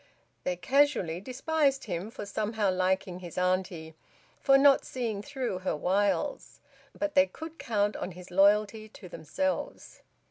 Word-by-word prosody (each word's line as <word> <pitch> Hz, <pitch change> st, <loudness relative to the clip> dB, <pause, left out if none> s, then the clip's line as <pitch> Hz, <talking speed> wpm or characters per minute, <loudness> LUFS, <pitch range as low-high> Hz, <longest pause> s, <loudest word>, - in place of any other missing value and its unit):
They 180 Hz, -, 0 dB
casually 235 Hz, -, +1 dB
despised 270 Hz, +3 st, 0 dB
him 185 Hz, 0 st, -4 dB
for 225 Hz, -, -7 dB
somehow 210 Hz, 0 st, -1 dB
liking 185 Hz, 0 st, 0 dB
his 175 Hz, -2 st, -10 dB
auntie, 180 Hz, -3 st, -1 dB, 0.5 s
for 275 Hz, -1 st, +5 dB
not 275 Hz, 0 st, +5 dB
seeing 230 Hz, -5 st, -3 dB
through 240 Hz, -4 st, -4 dB
her 185 Hz, -, -2 dB
wiles; 200 Hz, -, -1 dB, 0.4 s
but 300 Hz, -1 st, -2 dB
they 280 Hz, 0 st, +5 dB
could 320 Hz, +2 st, -10 dB
count 205 Hz, -2 st, 0 dB
on 180 Hz, -, -5 dB
his 180 Hz, +1 st, -12 dB
loyalty 210 Hz, +3 st, +3 dB
to 195 Hz, -, -12 dB
themselves. 280 Hz, -, -4 dB
205 Hz, 140 wpm, -29 LUFS, 185-270 Hz, 0.5 s, for